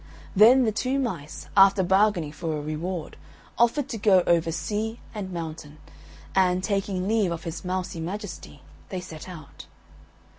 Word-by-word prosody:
Then 235 Hz, +6 st, +7 dB
the 220 Hz, -, +2 dB
two 255 Hz, +5 st, -1 dB
mice, 185 Hz, -, -4 dB
after 195 Hz, 0 st, +6 dB
bargaining 190 Hz, -4 st, +2 dB
for 155 Hz, +1 st, -3 dB
a -, -, -4 dB
reward, 155 Hz, +3 st, -4 dB, 0.4 s
offered 240 Hz, +4 st, +3 dB
to 225 Hz, -, -4 dB
go 195 Hz, -3 st, +5 dB
over 165 Hz, -1 st, +2 dB
sea 215 Hz, +7 st, -3 dB
and 200 Hz, -4 st, -5 dB
mountain, 160 Hz, -3 st, -6 dB, 0.6 s
and, 185 Hz, -1 st, +2 dB
taking 195 Hz, -2 st, -1 dB
leave 215 Hz, -4 st, +2 dB
of 170 Hz, -1 st, -4 dB
his 165 Hz, +3 st, -6 dB
mousy 185 Hz, -1 st, -3 dB
majesty, 175 Hz, -, -7 dB, 0.3 s
they 185 Hz, -, -3 dB
set 165 Hz, -1 st, -9 dB
out. 155 Hz, -6 st, -11 dB
185 Hz, 150 wpm, -26 LUFS, 165-210 Hz, 0.6 s, Then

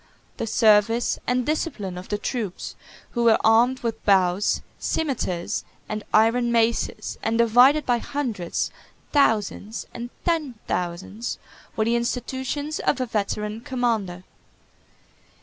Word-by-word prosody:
The 230 Hz, -, -3 dB
service 225 Hz, +1 st, +3 dB
and 250 Hz, 0 st, +1 dB
discipline 265 Hz, -, -2 dB
of 180 Hz, +1 st, -8 dB
the 205 Hz, -, 0 dB
troops, 210 Hz, -3 st, -4 dB, 0.4 s
who 235 Hz, -1 st, 0 dB
were 225 Hz, -1 st, +6 dB
armed 235 Hz, +4 st, +4 dB
with 230 Hz, -2 st, -3 dB
bows, 190 Hz, -1 st, +3 dB, 0.2 s
cimeters, 210 Hz, -, -1 dB, 0.2 s
and 215 Hz, 0 st, -4 dB
iron 235 Hz, +2 st, +4 dB
maces, 230 Hz, -2 st, 0 dB
and 225 Hz, +1 st, 0 dB
divided 245 Hz, +6 st, +5 dB
by 240 Hz, -1 st, +2 dB
hundreds, 230 Hz, -11 st, -2 dB, 0.4 s
thousands, 220 Hz, -5 st, +1 dB
and 240 Hz, 0 st, -6 dB, 0.2 s
ten 315 Hz, -7 st, 0 dB
thousands, 180 Hz, +6 st, -3 dB, 0.4 s
were 220 Hz, -, +1 dB
the 230 Hz, +1 st, +2 dB
institutions 260 Hz, +5 st, -2 dB
of 270 Hz, -, +1 dB
a 255 Hz, -, 0 dB
veteran 210 Hz, -1 st, -2 dB
commander. 225 Hz, -9 st, -1 dB
230 Hz, 120 wpm, -24 LUFS, 210-250 Hz, 0.4 s, were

